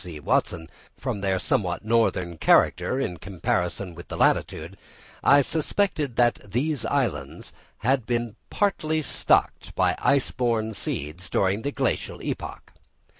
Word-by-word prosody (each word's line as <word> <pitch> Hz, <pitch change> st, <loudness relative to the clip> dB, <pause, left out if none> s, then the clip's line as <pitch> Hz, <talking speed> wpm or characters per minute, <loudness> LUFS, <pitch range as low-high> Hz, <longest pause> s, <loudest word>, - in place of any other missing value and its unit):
C. 85 Hz, -4 st, -8 dB
Watson) 80 Hz, +2 st, 0 dB, 0.3 s
from 100 Hz, -, -3 dB
their 95 Hz, -1 st, +1 dB
somewhat 90 Hz, +1 st, -1 dB
northern 95 Hz, -7 st, +1 dB
character, 130 Hz, -, +3 dB
in 90 Hz, -9 st, -2 dB
comparison 90 Hz, 0 st, -2 dB
with 85 Hz, +1 st, -11 dB
the -, -, -6 dB
latitude, 80 Hz, +5 st, +1 dB, 0.5 s
I 140 Hz, 0 st, +6 dB
suspected 155 Hz, -, -1 dB
that 120 Hz, -1 st, +3 dB
these 125 Hz, +7 st, -1 dB
islands -, -, -2 dB, 0.2 s
had 130 Hz, 0 st, +1 dB
been 120 Hz, -2 st, -1 dB
partly 160 Hz, -6 st, 0 dB
stocked -, -, +1 dB
by -, -, +2 dB
ice 140 Hz, -2 st, +2 dB
borne 115 Hz, -3 st, 0 dB
seeds 85 Hz, 0 st, -4 dB
during 100 Hz, +2 st, +1 dB
the 140 Hz, -, -2 dB
Glacial 135 Hz, -3 st, -1 dB
epoch. -, -, -5 dB
110 Hz, 130 wpm, -25 LUFS, 90-135 Hz, 0.5 s, I